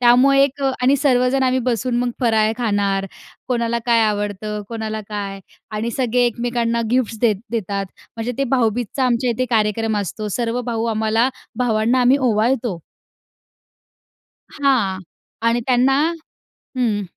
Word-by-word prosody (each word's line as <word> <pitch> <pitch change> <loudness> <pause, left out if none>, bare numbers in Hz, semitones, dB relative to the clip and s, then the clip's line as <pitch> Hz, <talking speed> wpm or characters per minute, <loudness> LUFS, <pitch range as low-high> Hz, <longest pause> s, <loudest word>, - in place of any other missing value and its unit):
त्यामुळे 255 +3 +5
एक 280 0 -1 0.2
आणि 265 +3 +5
सर्वजण 260 -1 +2
आम्ही 260 0 +2
बसून 245 0 -1
मग 245 0 0
फराळ 220 -2 +3
खाणार. 200 -4 0 0.4
कोणाला 235 -1 0
काय 235 -1 +4
आवडतं? 210 0 -2
कोणाला 220 -1 -4
काय? 200 -2 -5 0.3
आणि 215 +2 -2
सगळे 250 -1 +2
एकमेकांना 235 0 -1
गिफ्ट्स 240 -3 0
देत 220 -4 +3
देतात. 200 -3 -2 0.3
म्हणजे 230 +2 -3
ते 275 - +2
भाऊबीजचा 245 +2 0
आमच्या 245 0 +1
इथे 255 +2 0
कार्यक्रम 220 -1 +1
असतो, 210 +2 -4
सर्व 240 0 -1
भाऊ 230 -1 -1
आम्हाला 220 +3 +2 0.3
भावांना 235 +1 +2
आम्ही 250 +3 +5
ओवाळतो. 220 -4 0 1.8
हां 245 -10 +2 0.5
आणि 240 +1 +1
त्यांना 260 +1 +3 0.8
हं. 225 -5 +1
235 Hz, 130 wpm, -20 LUFS, 215-250 Hz, 1.8 s, त्यामुळे